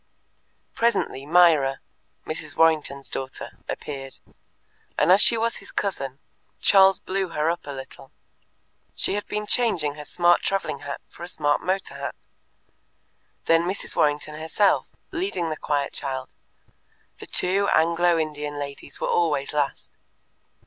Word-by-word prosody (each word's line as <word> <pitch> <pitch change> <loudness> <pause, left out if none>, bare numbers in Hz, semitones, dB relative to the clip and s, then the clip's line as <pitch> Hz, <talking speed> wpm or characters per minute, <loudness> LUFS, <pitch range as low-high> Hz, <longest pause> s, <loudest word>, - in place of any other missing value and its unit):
Presently 230 - 0
Myra 155 -5 +5 0.5
(Mrs. 155 -1 -6
Warrington's 150 -4 +2
daughter) 130 0 -6
appeared, 135 -2 -6 0.8
and 150 +4 +4
as 195 +3 +7
she 235 - +4
was 230 +1 0
his - - -12
cousin, 135 -10 -3 0.4
Charles 195 -1 +6
blew 190 0 -2
her 160 -1 0
up 170 - -6
a - - -4
little: 135 0 -10 0.8
she - - 0
had 205 +1 -3
been 210 0 -3
changing 190 -11 +1
her 150 0 -9
smart 175 +1 +3
traveling 195 -7 -1
hat 145 0 -6
for - - -17
a 175 - -5
smart 145 -4 +1
motor 190 +1 -2
hat. - - -5 1.3
Then 165 +1 +4
Mrs. 190 +2 -3
Warrington 150 +1 +1
herself, 160 +6 +2 0.2
leading 330 - -2
the - - -1
quiet 145 -2 -1
child; 130 -2 -4 0.9
the - - -9
two 195 +2 +1
Anglo 170 +1 +3
Indian 150 -2 -3
ladies 140 -1 -7
were - - -1
always 150 -5 +1
last. 145 -2 -2
160 Hz, 135 wpm, -24 LUFS, 145-185 Hz, 1.3 s, as